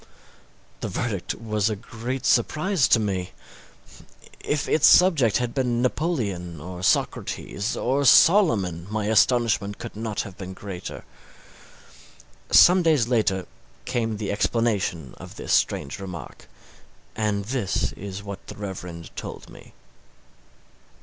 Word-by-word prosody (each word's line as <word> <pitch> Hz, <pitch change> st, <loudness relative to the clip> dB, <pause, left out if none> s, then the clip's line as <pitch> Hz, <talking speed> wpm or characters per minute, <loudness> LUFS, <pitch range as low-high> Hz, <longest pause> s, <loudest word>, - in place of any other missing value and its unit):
This -, -, -4 dB
verdict 105 Hz, -7 st, -3 dB
was 110 Hz, -2 st, -1 dB
a 110 Hz, -, -2 dB
great 120 Hz, +4 st, -6 dB
surprise 155 Hz, -, +2 dB
to 115 Hz, -, +4 dB
me. 95 Hz, -4 st, -3 dB, 1.1 s
If 145 Hz, -1 st, -2 dB
its 155 Hz, -, +4 dB
subject 155 Hz, -, +5 dB
had 120 Hz, -1 st, -2 dB
been 125 Hz, -3 st, 0 dB
Napoleon, 105 Hz, -, -2 dB
or 90 Hz, +3 st, -8 dB
Socrates, 100 Hz, +2 st, -1 dB
or 135 Hz, +3 st, 0 dB
Solomon, 115 Hz, -, +4 dB
my 110 Hz, -1 st, -2 dB
astonishment 110 Hz, -2 st, +2 dB
could -, -, -8 dB
not 110 Hz, -1 st, -3 dB
have 95 Hz, -, -9 dB
been 95 Hz, -1 st, -7 dB
greater. 95 Hz, -3 st, -7 dB, 1.5 s
Some 180 Hz, +1 st, +7 dB
days 150 Hz, -9 st, +2 dB
later 100 Hz, -6 st, +1 dB, 0.4 s
came 115 Hz, -3 st, -1 dB
the 105 Hz, -1 st, -3 dB
explanation 100 Hz, -, -1 dB
of -, -, -11 dB
this -, -, -3 dB
strange 70 Hz, -, 0 dB
remark, 90 Hz, -4 st, -9 dB, 0.7 s
and 105 Hz, -2 st, -1 dB
this 115 Hz, -5 st, -1 dB
is 100 Hz, 0 st, -8 dB
what 100 Hz, -1 st, -8 dB
the -, -, -8 dB
Reverend 90 Hz, -5 st, -8 dB
told -, -, -8 dB
me. -, -, -15 dB
110 Hz, 125 wpm, -24 LUFS, 95-125 Hz, 1.5 s, Some